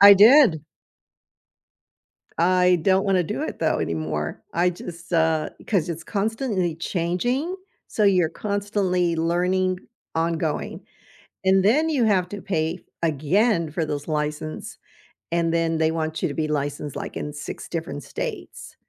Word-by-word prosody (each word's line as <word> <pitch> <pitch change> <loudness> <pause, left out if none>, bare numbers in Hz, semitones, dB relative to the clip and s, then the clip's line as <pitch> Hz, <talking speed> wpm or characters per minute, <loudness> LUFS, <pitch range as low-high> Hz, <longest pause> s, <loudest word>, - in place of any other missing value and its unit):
I 200 0 +11
did. 215 - +7 1.8
I 180 +1 +4
don't 190 +2 +3
want 195 -2 +2
to 180 - +3
do - - -3
it - - -4
though - - +1
anymore. 80 -2 -3
I 175 +2 +3
just, 175 0 -9
uh, 160 -2 +2 0.2
'cause 185 -6 +1
it's 165 -1 -5
constantly 205 -4 -1
changing, 195 - -1 0.3
so 215 - 0
you're 185 -5 +4
constantly 195 -3 -1
learning, 180 +3 +1 0.3
ongoing, 165 -1 -1 0.6
and 190 0 +4
then 295 +10 +4
you 280 -7 +2
have 190 -5 +2
to 205 -2 -6
pay 170 -3 -2 0.2
again 165 - +2
for 160 +1 -1
those 145 0 -4
license, 150 0 -3 0.5
and 170 -1 +1
then 165 -1 +1
they 160 0 +2
want 160 -1 -2
you - - +2
to - - -4
be 155 -1 -1
licensed, 145 -1 -3
like, - - -5
in 150 - -5
6 150 - -7
different 165 -4 -4
states. - - -6
170 Hz, 145 wpm, -24 LUFS, 160-195 Hz, 1.8 s, I